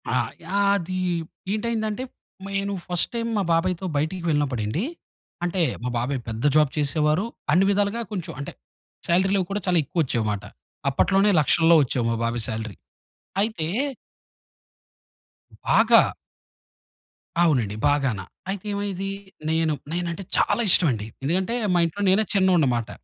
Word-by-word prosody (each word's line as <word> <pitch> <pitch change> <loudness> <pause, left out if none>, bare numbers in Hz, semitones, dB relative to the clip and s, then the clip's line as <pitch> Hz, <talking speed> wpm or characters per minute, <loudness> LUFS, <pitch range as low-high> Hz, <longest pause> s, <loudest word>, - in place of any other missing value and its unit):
ఆ! - - 0 0.3
యాది 195 -1 +1 0.5
ఏంటైందంటే, 220 +1 -2 0.4
నేను 200 0 -2
ఫస్ట్ 175 -2 0
టైమ్ 230 0 -2
మా 200 - +1
బాబాయి‌తో 180 +2 0
బయటికి 160 +5 -2
వెళ్ళినప్పుడండి, 140 - 0 0.6
అంటే 175 +1 0 0.2
మా 125 - -1
బాబాయి 130 +3 -1
పెద్ద 115 +1 -5
జాబ్ 150 -3 +4
చేసేవారు, 150 +5 +1 0.3
అన్ని 185 +4 +5
విధాలుగా 205 +3 +1
కొంచెం 185 -5 -4
అంటే, 140 - -6 0.5
సాలరీలవి 190 +2 +2
కూడా 205 +1 -1
చాలా 180 -1 +3
ఎక్కువొచ్చేవిమాట. 120 - -1 0.5
అప్పట్లోనే 195 +9 +3
లక్షల్లో 165 +3 +4
వచ్చేవి 125 -2 -1
మా - - 0
బాబాయి 115 0 -2
సాలరీ. 110 -2 -4 0.7
అయితే 205 -7 -1 2.0
బాగా. - - +6 1.4
అవునండి 125 -11 +2
బాగాన. 135 -7 +1 0.3
అయితే 195 0 -4
ఏమయ్యేదీ, 195 -1 -3 0.4
నేను 160 -1 +1 0.2
నేనంటే 175 +1 -3
చాల - - +2
ఇష్టమండి. 120 - +4 0.2
ఎందుకంటే 185 - 0 0.2
మా - - +4
ఇంట్లో 165 +5 -4
నేనే 195 +4 +4
చిన్నోడ్నిమాట. 155 - +2
170 Hz, 115 wpm, -24 LUFS, 140-195 Hz, 2.0 s, బాగా